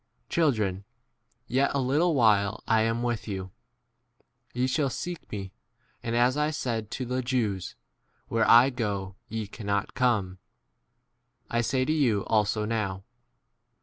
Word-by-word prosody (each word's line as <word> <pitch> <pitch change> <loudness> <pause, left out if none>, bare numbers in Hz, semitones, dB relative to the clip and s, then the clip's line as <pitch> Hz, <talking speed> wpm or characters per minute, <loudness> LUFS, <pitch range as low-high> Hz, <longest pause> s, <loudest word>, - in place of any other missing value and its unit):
Children, 110 - +1 0.6
yet 135 +3 +2
a - - +2
little 150 +6 +2
while 105 -5 +3
I 110 -1 +4
am 115 +2 0
with 120 -2 -2
you. 95 -2 -5 1.0
Ye 125 +1 0
shall 135 +2 +1
seek 175 +6 -6
me; 95 -3 -5 0.5
and, 115 0 -2
as 125 +2 +3
I 150 +1 +1
said 115 -8 -3
to 130 - -4
the 125 +1 -1
Jews, 115 -8 -1 0.5
Where 115 0 +1
I* 120 +4 +8
go 100 -6 -3 0.2
ye* 110 -1 -3
cannot 100 -1 -3
come, 105 -7 +1 1.1
I 120 - +2
say 130 +2 0
to 155 - +1
you 120 -10 +2
also 105 0 +1
now. 105 -4 -2
115 Hz, 140 wpm, -27 LUFS, 100-130 Hz, 1.1 s, I